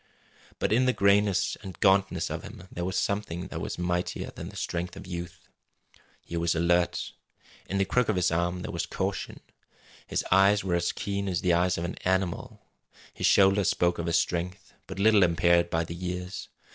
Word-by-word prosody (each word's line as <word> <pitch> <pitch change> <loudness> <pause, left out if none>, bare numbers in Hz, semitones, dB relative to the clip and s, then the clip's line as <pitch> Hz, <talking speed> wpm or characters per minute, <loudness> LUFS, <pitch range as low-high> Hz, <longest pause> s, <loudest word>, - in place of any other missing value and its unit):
But - - 0
in 130 +3 +3
the 130 - +3
grayness 100 -1 +3
and 95 -4 -9
gauntness 95 -3 +2
of - - -3
him 90 - -11
there 85 - -4
was 95 +2 -2
something 95 -3 -2
that - - -5
was - - -4
mightier 90 0 -2
than - - -8
the - - -13
strength 85 +1 -3
of - - -9
youth. 90 0 -7 0.8
He 85 - -6
was 85 0 +1
alert. 85 +1 +1 0.6
In 100 - -1
the 95 - +2
crook 125 +3 +1
of 110 - +2
his 90 -3 +2
arm 85 +1 -1
there - - -5
was - - -3
caution. - - -3 0.7
His - - -1
eyes 100 +2 +5
were 95 -2 -1
as 85 0 +1
keen 100 -1 -3
as 90 -3 -1
the 90 -2 +2
eyes 90 +1 +2
of 85 - -3
an 85 - -5
animal. 95 -1 -1 0.5
His - - 0
shoulders 95 0 +5
spoke 85 0 +1
of 85 - -3
a 85 - 0
strength 90 +4 -1
but - - -7
little 105 +1 +5
impaired 85 0 +3
by 80 0 0
the 85 - -6
years. 90 +1 -5
90 Hz, 195 wpm, -28 LUFS, 85-95 Hz, 0.8 s, eyes